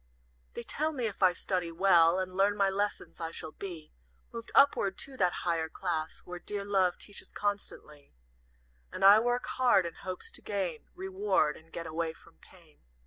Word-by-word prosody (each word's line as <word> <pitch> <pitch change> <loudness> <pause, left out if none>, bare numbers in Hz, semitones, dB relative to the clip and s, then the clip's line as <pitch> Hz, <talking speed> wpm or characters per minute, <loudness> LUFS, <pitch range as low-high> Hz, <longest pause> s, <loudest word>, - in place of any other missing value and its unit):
"They - - -5
tell 310 - -1
me 255 -5 -2
if 215 - -4
I 185 -2 +6
study 180 -1 -2
well, 170 -1 +5
And 185 -1 -3
learn 200 +2 +3
my 195 -1 +3
lessons, 205 +2 -2
I 165 - -2
shall 160 -1 -7
be 165 -4 -8 0.4
Moved 230 0 -7
upward 205 -8 +4
to 275 - -3
that 180 -5 +3
higher 165 -2 0
class 160 -3 -3
Where 180 0 -7
dear 200 +2 -4
Love 190 -3 +2
teaches 205 - -9
constantly; 155 - -4 0.8
And 195 - 0
I 205 +2 +9
work 245 +2 0
hard, 240 -8 +3
in 170 - -4
hopes 185 +2 -6
to - - -7
gain 185 -6 -3
Reward, 380 - +1
and 165 +1 -17
get 170 - -6
away 160 0 -2
from 165 - -21
Pain. 170 -5 -20
185 Hz, 180 wpm, -30 LUFS, 165-205 Hz, 0.8 s, I